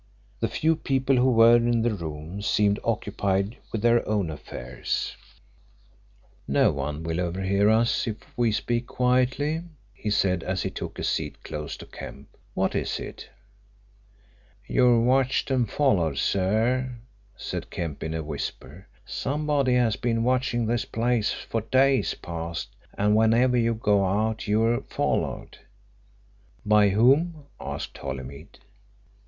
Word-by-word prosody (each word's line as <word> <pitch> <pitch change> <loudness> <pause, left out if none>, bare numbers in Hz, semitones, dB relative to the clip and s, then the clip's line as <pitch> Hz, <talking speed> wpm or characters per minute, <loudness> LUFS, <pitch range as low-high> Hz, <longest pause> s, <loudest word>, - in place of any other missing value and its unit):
The - - +1
few 160 +1 +1
people 135 -3 +1
who 125 +1 +4
were 115 0 +7
in 120 -1 +1
the 120 -1 +1
room 80 +1 -6
seemed 100 0 +2
occupied 100 -1 -1
with 110 - -3
their 120 0 +4
own 100 -6 0
affairs. 65 -4 -4 1.3
"No - - +3
one 75 +2 -4
will 80 +2 -2
overhear 95 +3 +1
us 115 +2 +2
if 110 -2 -3 0.2
we 120 -2 +2
speak 120 +3 -1
quietly," 130 +5 +1 0.3
he 105 - -5
said 95 -4 +2
as 95 +2 -2
he - - -2
took - - -6
a - - -4
seat - - -2
close 75 -1 -6
to - - -10
Kemp. - - -11 0.2
"What - - +1
is - - -2
it?" - - -8 1.4
"You're 120 -1 +4
watched 130 +2 +2
and 125 -5 +1
followed, 90 - +1
sir," 115 - +1 0.4
said - - -5
Kemp 75 -4 -5
in 80 0 -3
a 80 - -3
whisper. 75 +2 -6 0.2
"Somebody 145 -2 0
has 120 -3 +2
been 115 -1 0
watching 125 -1 +1
this 120 +1 0
place 115 -1 0
for 115 - -3
days 130 +4 +2
past 85 0 -5 0.3
and 105 +1 +3
whenever 115 +3 +4
you 115 -1 +2
go 105 -3 +2
out 110 +4 0
you're 115 +3 +2
followed." - - -2 1.1
"By 105 -1 +5
whom?" 140 - +3
asked - - -6
Holymead. 70 0 -7
110 Hz, 135 wpm, -26 LUFS, 95-125 Hz, 1.4 s, were